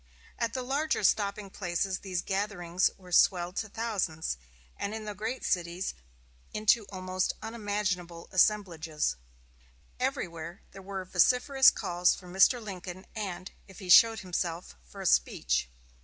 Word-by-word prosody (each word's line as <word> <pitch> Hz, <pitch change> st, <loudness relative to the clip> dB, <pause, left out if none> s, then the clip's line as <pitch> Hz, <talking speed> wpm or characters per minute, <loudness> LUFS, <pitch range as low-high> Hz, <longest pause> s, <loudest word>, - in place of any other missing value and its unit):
At 230 Hz, -1 st, -1 dB
the 255 Hz, -, -3 dB
larger 280 Hz, +1 st, 0 dB
stopping 200 Hz, 0 st, +1 dB
places 185 Hz, 0 st, -2 dB
these 185 Hz, -3 st, -3 dB
gatherings 190 Hz, -3 st, 0 dB
were 180 Hz, -2 st, -15 dB
swelled 175 Hz, 0 st, +3 dB
to 220 Hz, -, -2 dB
thousands, 195 Hz, -, -2 dB, 0.4 s
and 205 Hz, +2 st, -4 dB
in 220 Hz, -1 st, -6 dB
the 210 Hz, -, -4 dB
great 220 Hz, +5 st, -4 dB
cities 175 Hz, +1 st, -1 dB, 0.6 s
into 215 Hz, 0 st, +3 dB
almost 185 Hz, -1 st, -1 dB
unmanageable 205 Hz, -6 st, -3 dB
assemblages. 170 Hz, -, +1 dB, 0.8 s
Everywhere 170 Hz, +1 st, -3 dB
there 195 Hz, -, -11 dB
were 190 Hz, -1 st, -5 dB
vociferous 250 Hz, -, +5 dB
calls 175 Hz, 0 st, +1 dB
for 180 Hz, -, -13 dB
Mr. 190 Hz, +7 st, +4 dB
Lincoln, 185 Hz, -3 st, -8 dB
and, 190 Hz, -4 st, -5 dB, 0.2 s
if 195 Hz, -3 st, -14 dB
he 185 Hz, -, -9 dB
showed 225 Hz, +4 st, +7 dB
himself, 175 Hz, -2 st, -3 dB
for -, -, -11 dB
a -, -, -6 dB
speech. 60 Hz, 0 st, +2 dB
190 Hz, 135 wpm, -29 LUFS, 175-210 Hz, 0.8 s, showed